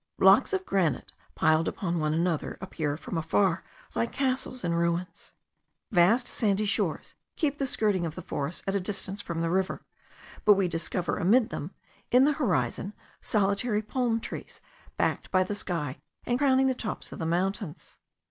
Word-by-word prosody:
Blocks - - +6
of 380 -1 -1
granite, 170 -9 0 0.2
piled 155 +1 +3
upon 175 -3 -1
one 155 -1 +1
another, 165 0 0
appear 155 -6 -3
from 165 +1 -4
afar 170 +2 +1 0.3
like 230 - 0
castles 255 -1 -1
in 170 -1 0
ruins. 170 +1 -2 0.6
Vast 215 +7 +4
sandy 210 -1 +1
shores 200 - -1 0.2
keep 290 -2 0
the 275 - 0
skirting 210 -8 +1
of 165 -2 -3
the - - -7
forest 145 +3 -4
at 195 - -1
a 200 - +2
distance 195 +1 -4
from 170 -4 -3
the 165 - 0
river; 190 +1 -1 0.6
but 210 - +7
we 195 -2 +2
discover 170 +1 -2
amid 215 +6 +4
them, 145 - -4 0.4
in 250 +2 +6
the 300 - +3
horizon, 230 -7 -1 0.3
solitary 210 +2 +1
palm 235 0 0
trees, - - -7 0.4
backed - - 0
by 185 -1 +3
the 185 - -4
sky, 165 -9 -3 0.3
and 245 +1 0
crowning 265 -2 +4
the 265 - +3
tops 230 -3 -5
of - - -8
the 165 - -2
mountains. 185 0 -2
195 Hz, 165 wpm, -28 LUFS, 170-230 Hz, 0.6 s, but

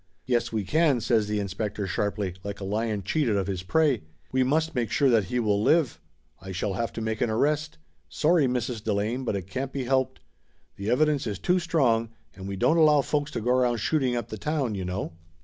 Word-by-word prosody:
"Yes, 120 -1 0
we 110 -2 -1
can," 150 - +2
says 110 -2 +1
the 105 0 -1
inspector 100 +1 -3
sharply, 100 +1 -2
like 100 0 -5
a - - -6
lion 105 +1 -1
cheated 120 - +1
of 100 -1 0
his 95 -2 -3
prey. 140 +4 +2 0.3
"We 130 - +2
must 155 +5 +1
make 120 -4 -1
sure 140 +2 +3
that 110 -4 +3
he 125 +7 -1
will 105 -3 +1
live. 130 - +2 0.4
I 95 +1 -7
shall 95 +2 -2
have 115 +5 -2
to 115 - -5
make 110 -1 -2
an 120 - +2
arrest. 150 +7 0 0.3
Sorry, 155 -2 +3
Mrs. 125 -3 -2
Delane, 110 +4 -1
but 115 - -1
it 95 -3 -4
can't 130 +8 -4
be 135 -1 -3
helped. 130 +1 0 0.6
The 100 +2 -4
evidence 145 +1 +2
is 105 -3 -3
too 180 - +2
strong, 130 -10 +1 0.3
and 95 0 -8
we 100 - -4
don't 160 - +3
allow 150 -3 +6
folks 145 +1 -1
to 120 - -2
go 120 +3 +1
around 125 -2 +2
shooting 130 +1 +1
up 120 -1 -3
the 110 - -6
town, 145 -3 -1
you 95 -2 -3
know!" 90 -1 -4
115 Hz, 220 wpm, -26 LUFS, 105-140 Hz, 0.6 s, allow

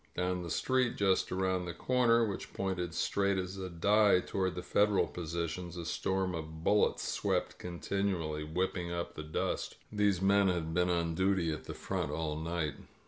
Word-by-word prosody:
Down 90 0 0
the 85 - -5
street, 130 +7 +1
just 95 -2 +2
around 95 -1 0
the 85 -1 -5
corner, 120 -2 +3
which 100 -3 -5
pointed 90 -3 -2
straight 100 -1 +1
as 95 +1 -3
a 95 -1 -4
die 100 +3 +4
toward 95 0 -1
the 90 - -4
Federal 105 -1 +3
positions, 85 +1 -4
a 85 - -5
storm 95 +1 -1
of 80 -1 -6
bullets 105 +4 +2
swept - - -1
continually, 85 -3 -2
whipping 90 +2 -2
up 85 0 -3
the - - -6
dust. 75 0 -2 0.2
These 105 -3 +2
men 100 +1 +4
had 85 -3 -1
been 90 +1 +2
on 85 -1 +1
duty 95 -1 +2
at 80 - -5
the - - -6
front - - -2
all 80 -2 -2
night. 80 -2 -2
90 Hz, 175 wpm, -32 LUFS, 85-100 Hz, 0.2 s, die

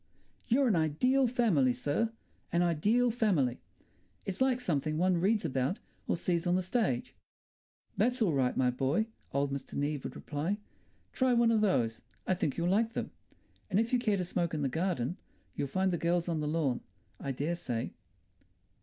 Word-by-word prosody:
"You're 265 +2 +3
an 215 - +3
ideal 250 - +3
family, 210 - +3
sir, 145 - 0 0.4
an 170 +1 +3
ideal 210 +9 +2
family. 180 - +1 0.7
It's 195 +4 -4
like 260 -1 +3
something 155 - -1
one 180 +1 +3
reads 210 +3 +2
about 130 - 0 0.3
or - - +1
sees 170 0 0
on 175 - +3
the 185 - +1
stage." 180 - 0 0.8
"That's 250 +5 +2
all 200 -9 +2
right, 130 -2 +1
my 125 -1 +3
boy," 135 - +1 0.3
old 140 0 0
Mr. 135 -1 -5
Neave 145 -1 -1
would - - -5
reply. 155 +7 -2 0.6
"Try 260 -1 +2
one 235 -1 +4
of 220 -2 +3
those; 120 - +1 0.2
I - - +2
think 165 -6 -1
you'll 170 0 0
like 220 +5 +2
them. - - -3 0.6
And 195 0 +2
if 230 +2 0
you 250 - +4
care 215 -4 +1
to 180 - -1
smoke 170 -2 -1
in 150 - -1
the 135 - +1
garden, 165 -1 -1 0.4
you'll 140 - -1
find 185 +7 +1
the 175 - -1
girls 170 +1 +1
on 165 -2 0
the 150 - -2
lawn, 150 -5 0 0.4
I 140 - -3
dare 145 +6 -1
say." 120 -9 -3
175 Hz, 180 wpm, -31 LUFS, 145-220 Hz, 0.8 s, one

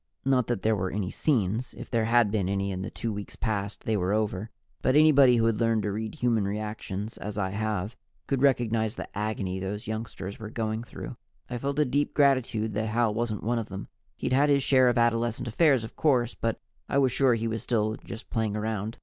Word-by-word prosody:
Not 130 -3 +3
that 120 -5 -2
there 110 0 +3
were 95 -2 -1
any 95 -2 -3
scenes. 115 -3 0
If - - -9
there 115 -2 +2
had 115 -2 +4
been 100 -4 0
any 100 0 -1
in 95 -1 -4
the - - -4
two 115 -1 -4
weeks 100 0 -7
past, 105 -3 -3
they 110 - 0
were 95 0 0
over. 105 -1 -1 0.3
But 130 - +2
anybody 140 -5 +6
who 115 - +3
has 115 -2 +1
learned 115 -2 +2
to 105 - -1
read 110 +1 -4
human 115 -4 +1
reactions, 105 0 -4
as 105 0 -5
I 95 -2 -1
have, 105 +1 -2 0.3
could 135 -2 -1
recognize 115 -5 +2
the - - -8
agony 100 -3 -2
those 100 +3 -4
youngsters 110 -3 -5
were 110 -2 -6
going 110 0 -2
through. - - -8 0.3
I 120 - -2
felt 140 +2 -2
a 150 - +4
deep 145 +3 0
gratitude 130 -6 +2
that 110 +2 -1
Hal 115 0 +1
wasn't 110 -2 -2
one 120 +1 +1
of 115 - -5
them. 95 0 -7 0.3
He'd - - -1
had 140 +3 +4
his 140 -1 +4
share 130 -2 +5
of 120 - 0
adolescent 115 0 +1
affairs, 135 0 +3
of 110 - -8
course, 125 -6 +2
but 115 -1 -2 0.3
I - - +1
was 135 -2 +4
sure 130 -1 +3
he 115 0 -2
was 115 -1 -2
still 110 -3 0
just 115 - -9
playing 110 -3 0
around. 110 +1 -3
110 Hz, 220 wpm, -27 LUFS, 105-120 Hz, 0.3 s, anybody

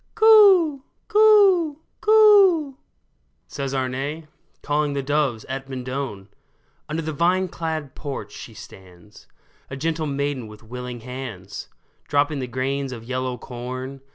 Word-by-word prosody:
Coo! 395 -10 +6 0.2
coo! 405 -8 +5 0.2
coo! 400 -9 +5 0.3
" - - -46
says 135 -2 -5
Arne, 135 +4 -3 0.4
Calling 145 0 0
the 140 -1 -2
doves 140 -5 0
at 135 0 -6
Mendon! 125 -6 -5 0.6
Under 160 +2 -3
the 155 0 -4
vine 180 +5 +1
clad 160 -5 -5
porch 135 -9 -6
she 115 - -10
stands, 95 +1 -15 0.4
A 135 - -6
gentle 160 +2 -2
maiden 140 -3 -2
with 105 +1 -14
willing 125 +1 -7
hands, 115 -6 -8 0.4
Dropping 145 0 +1
the 130 - -4
grains 135 +2 -2
of 115 -3 -8
yellow 130 +1 -3
corn. 130 +3 -7
140 Hz, 125 wpm, -23 LUFS, 125-170 Hz, 0.6 s, Coo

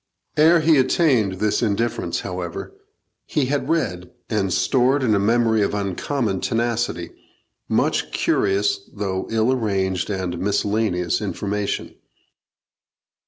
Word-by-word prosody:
Ere 165 +2 +5
he 155 -2 +4
attained 130 - +2
this 105 +2 0
indifference, 105 -5 -1
however, 90 -2 -5 0.5
he 145 - 0
had 145 +2 -1
read, 90 - -1 0.2
and 100 -4 0
stored 130 +8 +2
in 115 -4 +3
a 100 - +3
memory 110 +1 +2
of 100 - 0
uncommon 100 +2 -2
tenacity, 115 -6 -1 0.6
much - - +1
curious, 100 +1 +1
though 95 -2 -3
ill 115 +2 +2
arranged 95 -7 -1
and 95 -3 -3
miscellaneous 100 -2 0
information. 100 0 -3
105 Hz, 115 wpm, -22 LUFS, 95-120 Hz, 0.6 s, Ere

